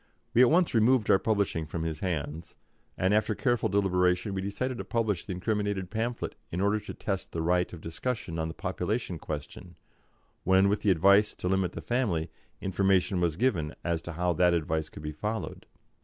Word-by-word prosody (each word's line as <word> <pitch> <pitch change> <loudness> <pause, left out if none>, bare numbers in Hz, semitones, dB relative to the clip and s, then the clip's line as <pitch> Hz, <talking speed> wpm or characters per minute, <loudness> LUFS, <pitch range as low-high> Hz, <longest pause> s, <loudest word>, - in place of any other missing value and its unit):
We 120 - +6
at 125 - +7
once 175 +2 +3
removed 115 0 +4
our 95 - +6
publishing 100 -7 0
from 80 +2 -4
his 80 -2 -3
hands, 80 -3 -4 0.4
and 95 +2 +2
after 110 0 +2
careful 120 -3 +1
deliberation 90 -1 +2
we 95 - -2
decided 115 +6 -3
to - - -3
publish 110 -6 -1
the 95 - -4
incriminated 100 -1 -2
pamphlet 115 +2 -2 0.2
in 85 - -3
order 100 +2 +2
to 105 - -8
test 95 -2 -3
the 80 - -2
right 90 +1 +1
of 85 - -9
discussion 85 0 -4
on 80 - -1
the 80 - -7
population 95 0 -2
question, 80 +4 -7 0.7
when, 95 +1 +4
with 105 - 0
the 105 - +2
advice 100 +4 +5
to - - -4
limit 95 -1 +1
the - - -6
family, 95 -11 -1 0.3
information 95 -1 +2
was 85 -3 +1
given 85 -8 0
as 85 -2 -1
to 85 - -7
how 90 +2 0
that 90 +1 +3
advice 80 -1 -1
could - - -11
be 75 - -3
followed. 105 +8 -4
95 Hz, 190 wpm, -29 LUFS, 85-105 Hz, 0.7 s, at